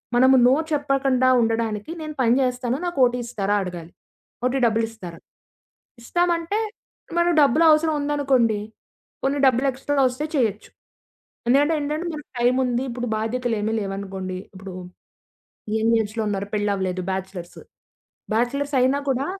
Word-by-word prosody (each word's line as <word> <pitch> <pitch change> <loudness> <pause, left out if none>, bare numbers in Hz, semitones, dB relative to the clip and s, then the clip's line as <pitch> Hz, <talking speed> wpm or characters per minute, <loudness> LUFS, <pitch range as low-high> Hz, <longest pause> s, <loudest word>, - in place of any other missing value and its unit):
మనము 260 +2 +6
నో 260 - +5 0.2
చెప్పకుండా 275 -3 +2
ఉండడానికి 225 +2 -1
నేను 310 -1 -6
పని 235 0 +4
జేస్తాను 250 0 -1
నాకు 345 -4 -4
ఓటీ 245 0 0
ఇస్తారా 205 -4 -1
అడగాలి. 175 -2 -7 0.5
ఓటీ 260 +2 +1
డబ్బులు 225 0 +1
ఇస్తారా, 175 -7 -10 0.8
ఇస్తామంటే 345 - 0 0.6
మనం 345 0 +3
డబ్బులు 290 +4 +4
అవసరం 310 +1 +3
ఉందనుకోండి, 270 -7 +1 0.6
కొన్ని 275 +1 0
డబ్బులు 260 +2 +2
ఎక్స్‌ట్రా 275 +2 0
ఒస్తే 285 +5 -4
చేయొచ్చు. 220 -6 0 0.8
ఎందుకంటే, 290 +5 +4
ఏంటంటే, 300 +4 -3
మనకు 300 -1 -8
టైం 245 +1 +3
ఉంది, 245 +1 0
ఇప్పుడు 245 0 -4
బాధ్యతలేమీ 225 -1 -1
లేవనుకోండి 195 -2 -5 0.2
ఇప్పుడు, 190 0 -9 1.1
యంగ్ 225 +1 +2
ఏజ్‌లో 220 +1 -4
ఉన్నారు. 200 -1 -2
పెళ్లవ్వలేదు. 195 -3 -1
బ్యాచిలర్స్. 190 -2 -6 0.7
బ్యాచిలర్స్ 280 +5 0
అయినా 260 +3 +3
కూడా 265 +1 +1
245 Hz, 125 wpm, -23 LUFS, 210-280 Hz, 1.1 s, మనము